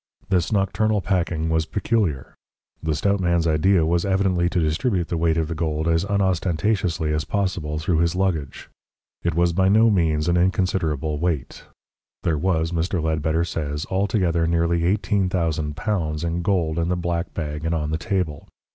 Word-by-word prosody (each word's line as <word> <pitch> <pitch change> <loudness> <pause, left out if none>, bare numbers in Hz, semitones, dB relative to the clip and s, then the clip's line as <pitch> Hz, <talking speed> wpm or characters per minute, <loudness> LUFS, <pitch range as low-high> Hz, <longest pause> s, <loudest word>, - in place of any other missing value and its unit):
This 90 -1 +1
nocturnal 105 +1 +1
packing 85 -3 -1
was 80 0 +1
peculiar. 100 - -1 0.5
The 80 -1 -1
stout 100 +6 +1
man's 85 -2 +1
idea 80 +2 +3
was 85 +1 +1
evidently 95 -3 +1
to 90 - 0
distribute 85 +4 0
the - - -1
weight 80 0 +1
of 80 -1 0
the 85 - -3
gold 80 -1 -2
as 80 +2 +2
unostentatiously 95 -3 0
as 75 0 0
possible 90 -7 -2
through 80 +1 0
his 85 +1 +1
luggage. 85 -8 -2 0.5
It 85 -2 -1
was 85 0 +2
by 95 +2 +3
no 110 +3 +5
means 80 -5 +1
an 85 0 +2
inconsiderable 85 -5 0
weight. 80 -5 -3 0.6
There 80 - +1
was, 80 -1 0
Mr. 85 +2 -1
Ledbetter 80 +1 0
says, 75 -3 -3
altogether 95 -4 +1
nearly 85 0 +1
L18,000 85 -3 -1
in 85 +1 -1
gold 85 -4 0
in 85 +1 0
the 90 - 0
black 85 0 -2
bag 75 -2 -4
and 80 +1 0
on 75 -1 -2
the 80 - -1
table. 85 -5 -2
85 Hz, 165 wpm, -23 LUFS, 80-95 Hz, 0.6 s, no